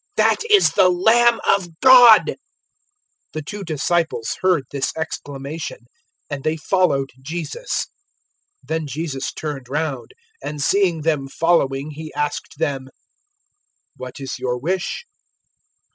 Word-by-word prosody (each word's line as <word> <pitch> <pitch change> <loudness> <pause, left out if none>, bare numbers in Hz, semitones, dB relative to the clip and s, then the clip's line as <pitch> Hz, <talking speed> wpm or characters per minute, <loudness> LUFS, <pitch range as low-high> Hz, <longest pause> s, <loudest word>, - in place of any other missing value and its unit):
that - - +4
is 415 -2 +6
the 185 - +4
Lamb 230 +6 +4
of 175 -5 +1
God!" 245 -4 +9
001:037 - - -3 1.0
The 155 - -4
two 205 +7 -7
disciples 160 -5 -1
heard 185 -6 +2
his 140 -1 -1
exclamation, 145 -3 -6 0.4
and 145 -2 -6
they 155 +1 0
followed 150 -6 +1
Jesus. 170 - -4 0.8
001:038 - - -26
Then 160 -1 -2
Jesus 140 -1 -4
turned 140 -5 -6
round, 145 -3 -3 0.3
and 150 - -5
seeing 175 +1 +2
them 150 -3 0
following 145 -2 +1
He 155 +1 -8
asked 150 -1 -3
them, 140 -4 -2 1.1
"What 130 +1 -9
is 135 -2 -5
your 125 -1 -1
wish?" 180 - -3
155 Hz, 125 wpm, -21 LUFS, 140-180 Hz, 1.1 s, God